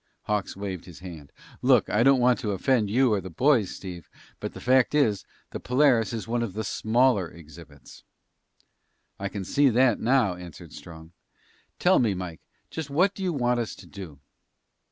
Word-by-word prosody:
Hawks 105 -3 -2
waved 95 -3 -5
his 90 -3 -12
hand. 80 -6 -10 0.3
"Look, - - +4
I 105 - +1
don't 135 +1 +5
want 125 0 +3
to 105 -6 -2
offend 110 +2 +1
you 125 +2 +3
or 100 - 0
the 95 - -8
boys, 120 - +2
Steve, 90 -4 -9 0.3
but - - -6
the - - -7
fact 130 +2 +3
is, 110 -10 +2 0.3
the - - -5
Polaris 125 -3 +2
is 115 -2 -5
one 120 +1 -1
of 115 -5 -3
the 110 +2 -3
smaller 110 -3 +1
exhibits!" 80 -3 -15 1.2
"I 100 0 -3
can 100 -1 -6
see 140 +6 +3
that 125 -1 +3
now," 120 -5 +2
answered 90 -2 -11
Strong. 80 -1 -12 0.7
"Tell - - +4
me, 110 -6 +1
Mike, 90 -3 -7 0.3
just 160 -3 -5
what 180 +8 +2
do 195 - -9
you 185 -2 0
want 125 -5 0
us 115 - -4
to - - -14
do?" 90 -8 -10
105 Hz, 180 wpm, -26 LUFS, 90-125 Hz, 1.2 s, don't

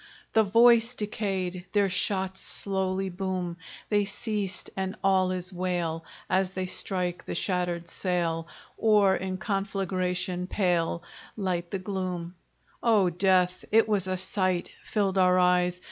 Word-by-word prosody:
The 220 - +6
voice 230 +3 +5
decayed, 190 -4 -3
their 205 -1 +3
shots 190 0 0
Slowly 190 -1 -2
boom. 180 -2 -3 0.3
They 205 -1 +2
ceased 205 -1 -2
and 190 0 -3
all 190 -1 +3
is 185 0 -2
wail, 175 -3 -2 0.2
As 190 0 +1
they 185 0 -2
strike 180 -1 0
the - - -4
shattered 175 -2 -1
sail, 165 -2 -1 0.3
Or 205 -3 +4
in 185 0 -3
conflagration 185 -3 -2
pale 175 -4 0 0.3
Light 180 -4 -2
the 195 - -2
gloom. 185 -3 -4 0.5
Oh 210 -6 +3
death! 185 0 +2
it 225 +1 +5
was 200 -4 0
a 185 0 -1
sight 185 -1 -1
Filled 195 -3 0
our 185 0 +5
eyes! 180 0 +3
185 Hz, 130 wpm, -27 LUFS, 180-195 Hz, 0.5 s, The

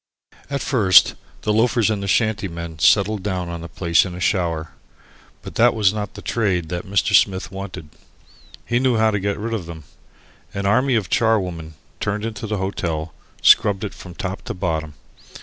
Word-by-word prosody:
At 140 -1 -2
first 105 -9 +5 0.3
the 105 - +1
loafers 115 0 +2
and 105 -2 -2
the 100 - -4
shanty 110 0 +1
men 85 -2 -7
settled 100 +4 +3
down 90 -3 -3
on 85 -1 -6
the 85 - -7
place 85 -2 +2
in 90 -1 -6
a - - -7
shower. 85 -4 -1 0.7
But - - -8
that 120 0 +5
was 105 -3 +3
not 105 -1 -5
the - - -9
"trade" 95 -8 -1
that 90 +3 -4
Mr. 100 -1 +1
Smith 95 -2 +3
wanted. 95 -4 -7 0.8
He 120 - +1
knew 130 -2 +2
how 110 0 +3
to 105 - -1
get 100 +1 -2
rid 115 +2 -4
of 95 -7 -4
them. 80 -2 -9 0.7
An 100 0 -3
army 125 +6 +3
of 105 -5 -1
charwomen, 90 -8 0 0.2
turned 105 +1 -2
into 110 0 -5
the 105 0 -2
hotel, 85 -4 -3 0.3
scrubbed 100 -1 +5
it 105 - -4
from 90 -1 -11
top 95 0 -5
to - - -5
bottom. 80 -5 -3
100 Hz, 185 wpm, -21 LUFS, 85-110 Hz, 0.8 s, first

